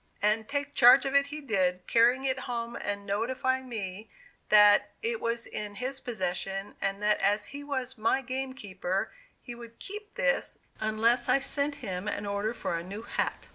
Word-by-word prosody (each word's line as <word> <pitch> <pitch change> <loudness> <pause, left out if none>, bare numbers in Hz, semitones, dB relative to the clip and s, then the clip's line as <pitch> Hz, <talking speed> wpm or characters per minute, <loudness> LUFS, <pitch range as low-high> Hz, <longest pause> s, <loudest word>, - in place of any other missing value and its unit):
And 215 +1 +1
"take 285 0 -2
charge" 245 +3 +7
of 270 - -1
it 280 0 +4
he 305 +1 -6
did, 185 -8 0
carrying 240 +3 +4
it 265 -1 0
home 235 -1 -3
and 200 0 -4
notifying 255 +5 -1
me 210 -2 -5 0.4
that 210 -1 +7
it 470 0 -1
was 230 0 -1
in 205 -1 -5
his 265 +4 -3
possession, 195 -2 -3
and 195 +1 -2
that 210 0 +3
as 205 +1 +1
he 285 +1 -7
was 260 -3 -4
my 230 +5 +2
game 260 +1 -3
keeper 190 -5 -3 0.3
he 245 - -7
would 235 -1 -11
"keep" 420 +1 -9
this, - - +1 0.2
unless 225 +3 +2
I - - +6
sent 285 +1 0
him 185 0 -4
an 205 - -2
order 200 +3 -2
for 200 - -2
a 165 - -3
new 200 +5 -7
hat. - - -3
230 Hz, 180 wpm, -29 LUFS, 205-265 Hz, 0.4 s, charge